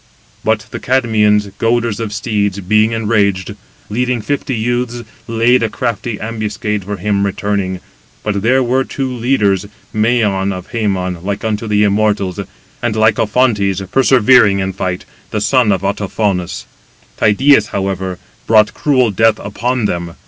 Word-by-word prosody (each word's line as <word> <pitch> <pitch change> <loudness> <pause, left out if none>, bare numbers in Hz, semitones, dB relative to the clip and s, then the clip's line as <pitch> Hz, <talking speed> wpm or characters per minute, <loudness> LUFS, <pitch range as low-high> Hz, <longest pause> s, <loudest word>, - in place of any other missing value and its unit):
But 110 -1 +1
the - - -5
Cadmeans, 110 -5 +2
goaders 115 -2 0
of 115 -2 -3
steeds, 105 -2 -1
being 110 +4 +2
enraged, 105 -4 0 0.3
leading 125 +3 -1
fifty 135 +3 -2
youths, 120 +1 -2 0.2
laid 115 +2 +3
a 115 - 0
crafty 115 -1 -3
ambuscade 105 -2 -3
for 100 +2 -5
him 100 +1 0
returning: 100 -2 -2 0.4
but 100 -2 -1
there 130 +5 +3
were 130 +2 +1
two 135 0 -3
leaders, 105 -6 +1 0.3
Mæon, 110 0 +2
son 95 +1 -1
of 90 0 -8
Hæmon, 95 -6 -2
like 100 +1 -3
unto 110 +1 -2
the 105 0 +2
immortals, 105 -2 +1 0.4
and 120 -3 -1
Lycophontes, 110 -2 +2
persevering 125 -5 +5
in 95 0 -2
fight, 90 -1 -3 0.2
the 110 - -2
son 110 +1 +3
of 95 -1 0
Autophonus. 100 -2 -2 0.5
Tydeus, 110 +1 +4
however, 95 -2 -3 0.3
brought 110 -1 +4
cruel 130 -6 +2
death 110 +2 +3
upon 120 +4 -2
them. 85 -4 -3
105 Hz, 140 wpm, -15 LUFS, 100-115 Hz, 0.5 s, persevering